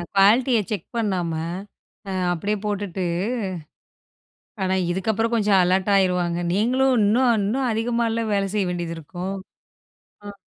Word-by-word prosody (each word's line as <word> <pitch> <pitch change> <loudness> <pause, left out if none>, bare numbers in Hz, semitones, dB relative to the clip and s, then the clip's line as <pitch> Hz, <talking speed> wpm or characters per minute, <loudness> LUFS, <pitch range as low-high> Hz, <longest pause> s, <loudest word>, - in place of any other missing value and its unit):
குவாலிடிய 230 +5 +5
check 205 -6 -3
பண்ணாம, 185 -7 -1 0.8
அ, - - -3 0.2
அப்படியே 200 +5 -2
போட்டுட்டு, 200 -3 -2 1.6
ஆனா 190 0 +1 0.2
இதுக்கு 190 +4 0
அப்புறம் 225 +2 0
கொஞ்சம் 205 -3 +3
அலர்ட் 185 +3 +1
ஆயிருவாங்க. 180 -2 +1
நீங்களும் 255 +6 +2
இன்னும் 235 +4 +4
இன்னும் 245 +6 0
அதிகமா 230 +1 0 0.3
வேலை 200 -1 +1
செய்ய 205 -2 +1
வேண்டியது 170 -1 -4
இருக்கும். 180 +5 -5 0.9
அ. 205 - -7
200 Hz, 120 wpm, -23 LUFS, 185-225 Hz, 1.6 s, குவாலிடிய